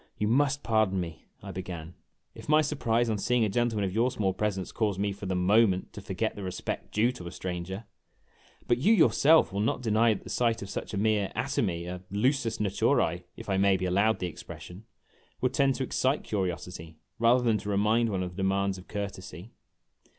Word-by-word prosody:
"You 105 - 0
must 140 +4 +2
pardon 110 -4 +2
me," 85 -3 -6 0.2
I 100 - -6
began, 90 -3 -7 0.4
"if - - -11
my 155 0 +6
surprise 120 -6 0
on 110 -2 -1
seeing 125 +1 +2
a - - 0
gentleman 110 -1 0
of 95 - -3
your 115 +4 +2
small 100 -7 -1
presence 100 -3 -2
caused 105 -4 -1
me 100 0 0
for 100 0 -7
the 95 - -1
moment 95 +1 +3
to 105 - -8
forget 100 +3 -2
the 105 - -7
respect 95 -1 -5
due 115 +4 +2
to 90 -9 -9
a - - -6
stranger. 90 +4 -5 0.8
But 120 0 +2
you 210 - +5
yourself 160 - +5
will 100 - -2
not 115 +4 0
deny 110 0 +3
that - - -9
the - - -10
sight 115 -3 +1
of 100 - -8
such - - -5
a - - -2
mere 105 -1 +1
atomy 85 -1 -1
a 90 0 -6
lusus 115 +2 +1
natures, 95 -4 +1 0.2
if - - -9
I 95 -1 +1
may 95 0 +4
be 95 - -3
allowed 100 +5 +2
the - - -3
expression 90 +3 -9 0.5
would 125 0 0
tend 135 -1 +3
to 135 - -2
excite 130 +2 0
curiosity 90 -4 -4 0.2
rather 120 +2 +4
than 115 -3 +2
to 105 - -6
remind 110 +3 +2
one 95 -3 -1
of 90 - -4
the 90 - -15
demands 95 0 0
of 90 - -14
courtesy." 100 -1 -6
105 Hz, 205 wpm, -28 LUFS, 95-115 Hz, 0.8 s, my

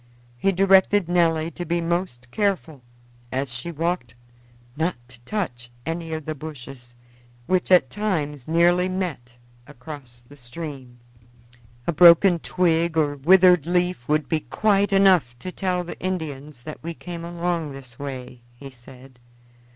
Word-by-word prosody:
He 160 +11 +1
directed 195 0 +4
Nelly 165 -2 +2
to 175 - -6
be 170 +1 -1
most 165 -8 -3
careful 185 -8 -1 0.5
as 130 -1 -2
she 130 +8 -5
walked 165 -7 -3 0.6
not 165 +4 -1
to 125 -1 -14
touch 125 - -4 0.2
any 165 0 -4
of 160 -2 -4
the 155 - -3
bushes, 135 -5 -10 0.5
which 185 +4 0
at 175 -9 +5
times 155 - -2
nearly 175 +3 +3
met 170 -11 -4 0.3
across 130 -3 -11
the 145 - -15
stream. 130 -1 -8 0.9
"A 170 - 0
broken 170 +2 +7
twig 170 -1 +1
or 145 -2 +2
withered 180 +2 +5
leaf 180 -7 0
would 155 0 +1
be 160 - 0
quite 205 +3 +1
enough 185 -11 +4
to 185 +9 -7
tell 180 -1 -1
the 175 - -8
Indians 150 -7 -5
that 155 - -8
we 170 +1 -6
came 170 -1 -8
along 170 -2 -2
this 130 -3 -12
way," 130 -3 -7
he 135 +2 -11
said. 130 +1 -16
160 Hz, 145 wpm, -23 LUFS, 135-180 Hz, 0.9 s, broken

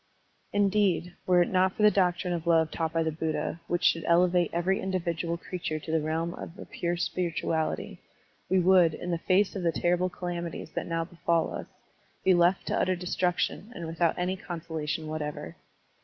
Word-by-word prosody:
Indeed, 200 -4 +2
were 180 -1 +5
it - - -4
not 185 0 +2
for 215 - -1
the 210 - +7
doctrine 180 -2 +1
of 170 -1 -4
love 160 -2 +4
taught 160 -1 -2
by 165 0 +1
the 160 - 0
Buddha, 160 +1 -3
which 175 - -1
should 165 - +3
elevate 175 0 +3
every 175 +3 +1
individual 170 -3 -2
creature 170 -3 -4
to 155 +1 -6
the 160 -1 +2
realm 165 +2 -1
of 170 - -9
a - - -8
pure 175 0 -2
spirituality, 165 -2 -2 0.5
we 190 +1 +4
would, 180 -3 +5
in 180 - -5
the 170 - -1
face 185 +4 +2
of 195 - -3
the 170 -1 +2
terrible 175 +3 +1
calamities 175 -3 -5
that - - -4
now 165 -1 -1
befall 170 -1 0
us, - - -5 0.6
be 190 - +5
left 175 +2 +3
to - - 0
utter 185 - +2
destruction 180 +4 -1
and 170 - -5
without 165 0 0
any 180 +1 0
consolation 160 -3 -4
what 155 0 -4
ever. 150 - -5
175 Hz, 185 wpm, -28 LUFS, 165-180 Hz, 0.6 s, the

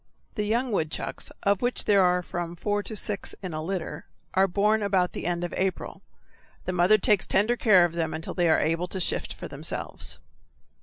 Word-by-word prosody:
The 210 -2 -2
young 240 +3 0
woodchucks, 160 -6 -2
of 200 -1 +2
which 245 0 0
there 200 -2 +5
are 180 0 +2
from 175 0 -5
four 205 +4 -1
to 220 - -7
six 205 -1 -3
in 180 -3 -4
a 155 - -3
litter, 180 0 -4 0.3
are 190 +1 +4
born 210 +4 +2
about 190 -3 +1
the - - -5
end 175 0 -1
of 175 - -4
April. 190 -1 -2 0.6
The 185 - -2
mother 180 +4 +5
takes 205 -1 +2
tender 215 +5 +2
care 200 -7 +5
of 170 - -3
them 165 -2 -1
until 160 - -4
they 175 -2 +2
are 160 - +4
able 165 +3 0
to 190 - -3
shift 180 - 0
for - - -7
themselves. - - -3
185 Hz, 200 wpm, -26 LUFS, 175-205 Hz, 0.6 s, there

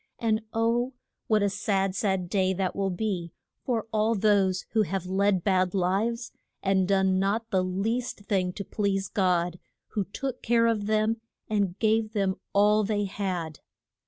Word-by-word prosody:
And 220 -1 +1
oh! 235 +3 +1 0.3
what 215 -2 +3
a 200 - +3
sad, 195 -1 0
sad 190 -3 0
day 190 0 +1
that 185 0 -2
will 195 -1 0
be 180 -3 -3 0.3
for 235 -4 -1
all 220 +1 +2
those 195 -3 +2
who 220 - +3
have 195 -2 -2
led 190 0 +1
bad 185 -2 +2
lives, 210 +6 0 0.3
and 190 -1 +2
done 190 -1 +3
not 220 +4 0
the 190 -2 +2
least 215 +6 -2
thing 190 -3 0
to 200 - -6
please 195 -1 -1
God, 180 -3 +1 0.3
who 205 -3 -2
took 250 +6 -5
care 230 0 +3
of 220 -3 +1
them 215 +1 +1 0.3
and 200 -4 0
gave 220 0 +1
them 195 -3 0
all 210 +1 +4
they 205 0 0
had. 185 -6 -3
200 Hz, 160 wpm, -27 LUFS, 190-220 Hz, 0.3 s, all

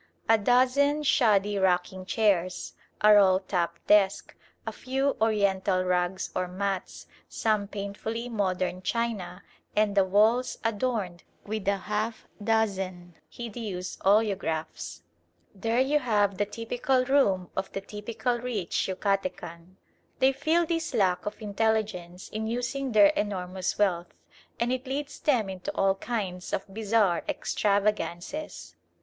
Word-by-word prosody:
A 225 - +6
dozen 260 +6 +3
shoddy 210 -7 +3
rocking 185 0 0
chairs, 190 -5 +1 0.3
a 210 0 +7
roll 190 -2 +6
top 180 -3 -2
desk, 200 -2 +3 0.3
a - - -3
few 270 +1 -1
Oriental 200 -4 +2
rugs 180 +1 0
or 185 0 0
mats, 190 +1 -4 0.2
some 215 -2 0
painfully 210 +4 -5
modern 185 -5 -1
china, 200 -3 -2 0.3
and 210 -1 +2
the 200 -1 +4
walls 215 +6 +2
adorned 215 -6 -1
(!) - - -36
with 215 -1 -4
a 200 0 +3
half 210 +3 -3 0.2
dozen 190 -5 -1 0.2
hideous 215 -6 -6
oleographs: 160 - 0 0.5
there 225 +4 0
you 280 +3 +3
have 205 -6 +1
the 205 - +1
typical 245 +4 0
room 200 -10 +2
of 190 0 -3
the 195 - -3
typical 225 +4 -3
rich 230 -8 -2
Yucatecan. 185 -3 -3 0.4
They 265 +1 +4
feel 315 +5 +2
this 330 -4 -2
lack 190 -3 +1
of 210 - -5
intelligence 205 -4 -1
in 220 +1 -3
using 245 +2 -2
their 205 -2 +7
enormous 185 -2 -2
wealth, 180 -4 0 0.4
and 240 +2 +1
it 255 +1 -4
leads 280 +2 -4
them 245 -9 +2
into 190 -1 -5
all 195 0 +3
kinds 190 -4 -4
of - - -1
bizarre 210 -4 +2
extravagances. 210 - -1
205 Hz, 130 wpm, -27 LUFS, 185-230 Hz, 0.5 s, a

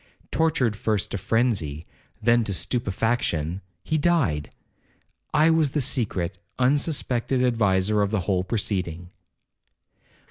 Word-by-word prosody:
Tortured 155 -9 +1
first 105 -2 -1
to - - -2
phrenzy, 95 - 0 0.4
then 120 +1 +4
to 100 - -1
stupefaction,—he 95 - -2
died! 140 - +1 0.8
I 155 +2 +4
was 160 -4 +2
the 150 - +1
secret, 100 -10 -1 0.2
unsuspected 130 -2 +1
adviser 105 -4 +2
of 100 - +1
the 105 -2 0
whole 90 +1 0
proceeding.' 90 -4 -2
110 Hz, 105 wpm, -25 LUFS, 90-130 Hz, 0.8 s, then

